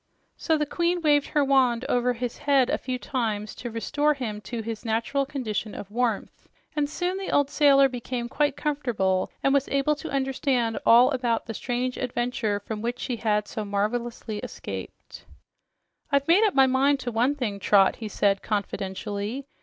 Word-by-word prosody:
So 320 -2 +1
the 300 - 0
queen 345 +3 0
waved 290 -2 +3
her 295 -2 +1
wand 260 -3 +3
over 245 0 +1
his 245 0 -5
head 280 -3 +3
a - - 0
few 255 -1 -3
times 220 -5 -2
to 240 - -6
restore 290 +6 0
him 220 -6 -4
to 230 0 -5
his 225 0 -5
natural 235 +5 0
condition 220 -6 -3
of 200 - -8
warmth, 230 -2 -2 0.3
and 290 -1 0
soon 355 +4 -2
the 390 - -5
old 285 0 +2
sailor 275 -2 +5
became 245 -1 -4
quite 290 +2 0
comfortable 235 -11 0
and 275 - +3
was 280 -1 +2
able 275 +2 +1
to - - -7
understand 265 -4 0
all 245 +3 +7
about 245 -4 0
the 225 - -5
strange 250 +3 -2
adventure 240 -4 -1
from 210 +1 -5
which 240 +2 -3
he 245 - -2
had 210 -2 0
so 215 - -4
marvelously 215 +2 -2
escaped. - - -8 0.9
"I've 280 0 +2
made 360 +6 +5
up 420 - +1
my 270 -1 +7
mind 270 +2 +2
to 245 - -3
one 245 +5 +1
thing, 220 -8 -3
Trot," 195 -1 +4
he 220 - -5
said 200 -1 +1
confidentially. 205 +3 -3
245 Hz, 175 wpm, -26 LUFS, 220-280 Hz, 0.9 s, all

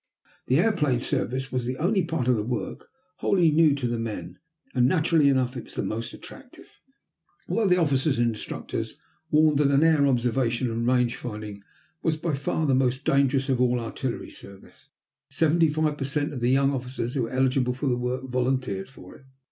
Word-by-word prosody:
The 130 - +3
airplane 165 - +2
service 130 +2 -2
was 125 -2 -2
the 130 +2 -3
only 190 +5 +1
part 160 -6 -2
of 125 - +4
the 110 - -1
work 120 +1 -4 0.3
wholly 175 -5 +3
new 155 -2 +4
to 135 -4 -2
the 120 -1 -2
men, 115 -2 -6 0.3
and, 125 -1 +3
naturally 160 -2 +3
enough, 130 -2 +1
it 120 - -6
was - - -14
the - - -2
most 115 +2 -4
attractive. - - -14 0.7
Although 225 -2 +1
the 180 -1 +4
officers 140 -4 +1
and 120 0 +2
instructors 110 -2 -5 0.3
warned 150 -1 +4
that 140 0 +3
air 155 -3 +4
observation 120 -1 0
and 115 +1 -2
range 125 -1 +2
finding 105 -3 -7 0.4
was 160 -2 0
by 160 0 -2
far 140 +3 -1
the 140 - +2
most 130 +1 +1
dangerous 135 0 +2
of 130 -2 +1
all 125 -1 +2
artillery 120 +2 -4
service, 100 -1 -14 0.4
seventy 160 0 +2
five 150 -1 -1
per - - -2
cent 145 +2 -2
of 130 - -4
the 120 +1 +1
young 135 +1 +3
officers 125 -2 -4
who 135 - -1
were 115 - -2
eligible 130 -1 +1
for 130 - -4
the 130 -3 +2
work 125 +1 -3
volunteered 125 -5 -1
for 135 - -14
it. 135 - -18
130 Hz, 190 wpm, -25 LUFS, 125-150 Hz, 0.7 s, of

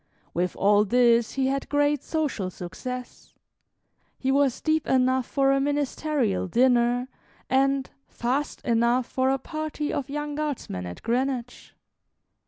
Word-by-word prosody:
With 180 +2 -1
all 205 +1 +4
this, 235 +1 +3
he 270 -1 0
had 275 +1 -1
great 290 -1 +2
social 290 - -2
success. 245 +9 -8 0.8
He 265 - 0
was 275 -2 +2
deep 315 -1 0
enough 260 -1 +2
for 275 -1 +2
a 275 0 +2
ministerial 285 -6 0
dinner, 245 +3 +3 0.4
and 270 0 +2 0.2
"fast" 265 +5 -2
enough 235 +2 +2
for 260 +1 0
a 270 - +2
party 310 +1 -4
of 280 0 -3
young 295 +1 -3
Guardsmen 285 - -4
at 90 - -9
Greenwich. 245 0 -2
260 Hz, 130 wpm, -26 LUFS, 235-285 Hz, 0.8 s, all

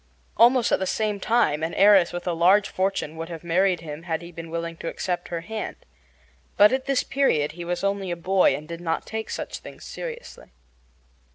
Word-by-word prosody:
Almost 240 0 +5
at - - +3
the 190 - -2
same 210 -1 -1
time 190 -9 +2
an 160 +1 -2
heiress 195 -3 +6
with 175 0 -6
a 175 - 0
large 185 +5 +4
fortune 185 -5 -2
would 165 +1 -5
have 165 -1 -8
married 180 +1 +2
him 150 -1 -7
had 165 -1 -3
he 170 - -10
been 165 0 -9
willing 170 0 -4
to 165 - -7
accept 180 +1 -3
her 170 -1 -4
hand. 220 +5 -5 0.8
But 210 +4 +7
at 260 0 -1
this 275 -2 +1
period 155 - +1
he 175 +2 -8
was 175 +2 -3
only 200 -1 -1
a 175 - -1
boy 185 +2 +3
and 150 +1 -8
did 170 +1 -7
not 165 -1 -2
take 220 0 -5
such - - -5
things - - -12
seriously. 485 0 -8
175 Hz, 205 wpm, -24 LUFS, 165-210 Hz, 0.8 s, But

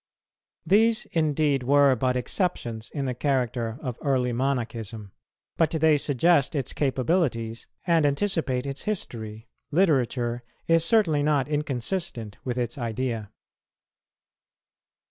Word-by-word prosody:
These, 220 +6 +3
indeed, 150 -3 +1
were 140 +1 +4
but 125 +1 0
exceptions 120 - -2
in 140 -2 -3
the 130 - -1
character 125 -3 -1
of 125 -3 -4
early 130 -4 +1
Monachism; 115 -5 -3 0.5
but 165 - +3
they 160 -1 +3
suggest 145 +2 +2
its 135 -3 -2
capabilities 130 -5 0 0.2
and 170 -3 +3
anticipate 145 -4 0
its 140 0 -4
history. 115 - -4 0.2
Literature 130 -8 +1 0.3
is 165 -1 +4
certainly 170 -6 +3
not 145 -2 +2
inconsistent 145 - -3
with 125 -1 -3
its 120 +2 -2
idea. 115 -2 -3
135 Hz, 110 wpm, -26 LUFS, 120-155 Hz, 0.5 s, were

